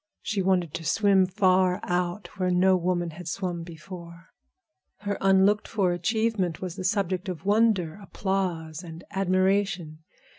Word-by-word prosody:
She 205 -3 -1
wanted 180 -4 +1
to 165 - -5
swim 195 +3 +3
far 185 0 +3
out, 180 +2 -2
where 185 -1 +1
no 185 +1 +4
woman 175 -1 -1
had 170 +1 -10
swum 175 0 -3
before. 170 +1 -10 0.7
Her 205 -1 -2
unlooked 195 +2 +4
for 195 -5 +1
achievement 190 -1 0
was 180 -2 -5
the 190 - -6
subject 190 -1 0
of 180 0 -6
wonder, 205 -5 +2
applause, 180 -5 -2
and 170 -1 -10
admiration. 190 -3 0
185 Hz, 140 wpm, -26 LUFS, 175-195 Hz, 0.7 s, no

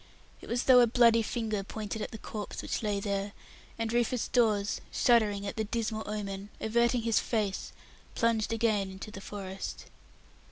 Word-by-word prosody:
It - - -11
was 240 +1 +1
as - - -4
though 255 -1 +7
a 240 - +6
bloody 230 -1 +5
finger 220 -2 -2
pointed 215 +1 -5
at - - -3
the 220 - -8
corpse 210 0 -6
which - - -2
lay 205 -2 0
there, 200 0 -2 0.4
and 225 0 -2
Rufus 240 0 +1
Dawes, 215 -4 +2
shuddering 210 -4 +3
at 200 - -5
the 220 - +1
dismal 220 0 -2
omen, 200 -1 -4
averting 235 +2 +2
his 230 -1 +3
face, 210 -4 -2 0.4
plunged 230 -2 +1
again 220 -4 +1
into 190 +3 -8
the 195 - -8
forest. 195 -1 -6
220 Hz, 170 wpm, -30 LUFS, 200-230 Hz, 0.4 s, though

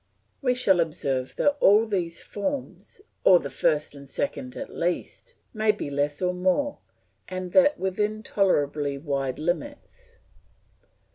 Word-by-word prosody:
We 250 -3 +2
shall 195 -8 +3
observe 135 -5 -1
that 290 0 +2
all 210 +3 +6
these 180 -6 -2
forms, 280 - -5 0.2
or 185 - +8
the 140 - -6
first 150 -1 +1
and 140 -1 -12
second 255 - -3
at 275 - -7
least, 180 - -3 0.2
may 215 -1 +3
be 205 -8 -6
less 145 +4 -1
or 180 0 +1
more, 185 +11 0 0.5
and 185 -1 -5
that 285 +5 +5
within 210 +3 -1
tolerably 145 -9 +1
wide 135 -3 -2
limits. 285 - -5
185 Hz, 135 wpm, -26 LUFS, 150-250 Hz, 0.5 s, or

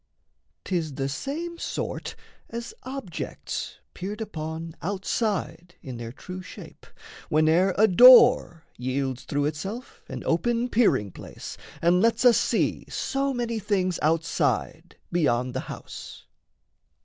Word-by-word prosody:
'Tis 165 -6 -2
the 135 0 -1
same 320 - -4
sort - - -4 0.3
as 235 0 -6
objects 255 - -5 0.2
peered 200 +4 -5
upon 160 -5 -5
Outside 190 -2 -2
in 130 -3 -6
their 115 -1 -6
true 180 +8 -8
shape, 180 - -12 0.4
whene'er 160 +5 +3
a 220 +2 +6
door 240 -5 +7 0.2
Yields 130 0 -2
through 145 0 0
itself 190 - -5
an - - -6
open 235 +9 +1
peering 205 - +2
place, - - -9 0.3
And 175 +2 +4
lets 230 +3 +2
us 240 -2 +7
see - - 0
so 275 +1 -1
many 235 -3 -2
things 190 -4 0
outside 165 +1 0
Beyond 125 -7 +1
the - - -2
house. - - -9
180 Hz, 120 wpm, -26 LUFS, 155-230 Hz, 0.4 s, door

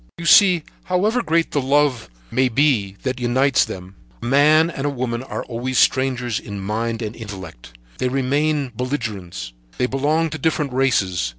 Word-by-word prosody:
"You 170 - -7
see, 180 -1 +6 0.2
however 210 +7 +1
great 165 -4 0
the 145 - 0
love 140 -2 +1 0.2
may 130 +2 +2
be 115 -7 +1
that 130 -1 -2
unites 130 +2 +2
them 90 +1 -9 0.3
a - - -8
man 150 +6 +4
and 140 -2 -3
a - - +1
woman 125 -3 -3
are 130 - -5
always 125 +2 -3
strangers 125 -3 +2
in 100 -1 -7
mind 115 +4 -3
and 110 +1 -5
intellect; 90 - -10 0.2
they 125 - 0
remain 140 +1 0
belligerents, 110 - -4 0.2
they - - +1
belong 150 +5 0
to 160 - -5
different 150 -4 -1
races. 95 - +1
130 Hz, 165 wpm, -21 LUFS, 115-145 Hz, 0.3 s, see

